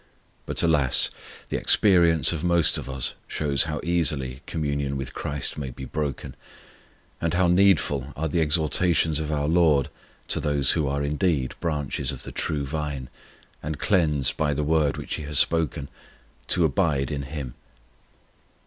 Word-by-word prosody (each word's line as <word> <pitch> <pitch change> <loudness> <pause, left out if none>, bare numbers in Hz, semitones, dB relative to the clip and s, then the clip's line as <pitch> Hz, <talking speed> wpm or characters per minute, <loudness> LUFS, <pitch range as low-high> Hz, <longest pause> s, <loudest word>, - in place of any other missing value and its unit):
But, - - -1
alas, 75 -6 +3 0.4
the - - -1
experience 85 -7 +4
of 80 -3 -4
most 85 -2 +2
of - - -8
us 65 -2 -2
shows 70 -2 +1
how 75 -1 -3
easily 75 -7 -1
communion 70 -3 -2
with 65 -1 -6
CHRIST 75 +1 -3
may 70 -3 -4
be 65 +1 -8
broken, 75 0 -4 0.9
and 85 0 0
how 90 0 +3
needful 85 -7 +2
are 80 +2 -2
the 80 +2 0
exhortations 80 0 +1
of 80 -1 -3
our 75 -1 -1
LORD 80 -4 +3 0.4
to - - +2
those 70 -2 +2
who 80 -4 0
are 70 +1 -1
indeed 75 -2 0
branches 75 -5 -2
of - - -7
the - - -7
true 75 -3 -2
Vine, 70 -3 -4 0.5
and 75 0 -4
cleansed 75 - +1
by 75 -2 0
the 75 - -1
Word 75 -1 +1
which - - -5
He 75 - -6
has 75 -1 0
spoken, 80 -4 +1 0.6
to 90 -2 +2
abide 75 -2 0
in 70 -1 -3
Him. 70 -3 -6
75 Hz, 160 wpm, -25 LUFS, 70-80 Hz, 0.9 s, experience